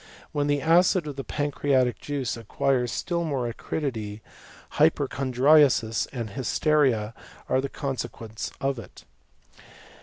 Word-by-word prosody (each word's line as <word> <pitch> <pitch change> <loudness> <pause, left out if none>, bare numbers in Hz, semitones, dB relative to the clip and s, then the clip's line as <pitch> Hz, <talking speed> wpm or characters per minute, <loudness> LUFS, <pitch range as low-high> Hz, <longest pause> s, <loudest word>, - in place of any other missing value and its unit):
When 145 -1 0
the 145 -1 +1
acid 175 +1 +4
of 145 -2 -5
the 135 - -5
pancreatic 140 -4 0
iuice 140 -4 -3
acquires 125 +2 0
still 170 -1 -2
more 135 -6 -1
acridity, 110 -4 -4 0.6
hypochondriasis 130 -3 +3
and 115 -5 -5
nysteria 130 -4 +1 0.3
are 130 - +2
the 140 - -3
consequences 120 -6 -5
of 135 -2 -1
it. 105 - -13
135 Hz, 115 wpm, -26 LUFS, 120-145 Hz, 0.6 s, acid